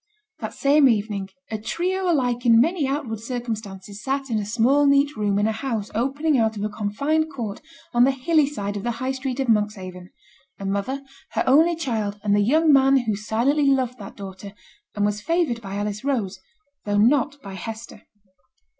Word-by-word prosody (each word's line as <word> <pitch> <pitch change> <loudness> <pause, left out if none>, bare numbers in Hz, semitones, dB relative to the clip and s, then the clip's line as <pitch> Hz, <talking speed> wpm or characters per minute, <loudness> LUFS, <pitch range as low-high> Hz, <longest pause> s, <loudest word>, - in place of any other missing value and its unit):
That - - -5
same 280 0 +5
evening, 205 -3 -1 0.2
a 220 - -2
trio 360 - -1
alike 245 -5 0
in 230 -1 +6
many 315 +2 +2
outward 270 -6 -3
circumstances 215 -4 -6
sate 270 -1 -2
in 220 - +1
a 205 - -3
small 255 +6 +3
neat 280 +1 +3
room 205 -2 0
in 205 - +2
a 220 - +2
house 220 -2 -3
opening 275 +5 +1
out 220 -1 +1
of 205 - -3
a 210 - -1
confined 280 +10 -1
court 220 -7 -5 0.3
on 240 0 +5
the 260 - +5
hilly 285 +3 +2
side 205 -8 -4
of 200 - -3
the 240 +3 -2
High 260 +2 -1
Street 265 0 -4
of 265 - 0
Monkshaven 195 -5 -1 0.5
a 195 - -7
mother, 200 +8 -2 0.3
her - - +1
only 320 +6 +5
child, 220 -10 -2
and 205 -1 +2
the 205 - +3
young 305 +8 +4
man 270 0 +5
who 220 -3 -1
silently 240 +8 +1
loved 255 -3 +1
that 200 - -9
daughter, 195 0 -9 0.4
and 205 -1 +1
was 210 0 -1
favoured 325 -6 0
by 195 -2 -6
Alice 205 +1 -3
Rose, 215 -9 -1 0.4
though 205 -1 0
not 275 +6 +3
by 195 -1 -8
Hester. 220 +3 -8
235 Hz, 190 wpm, -23 LUFS, 205-275 Hz, 0.5 s, in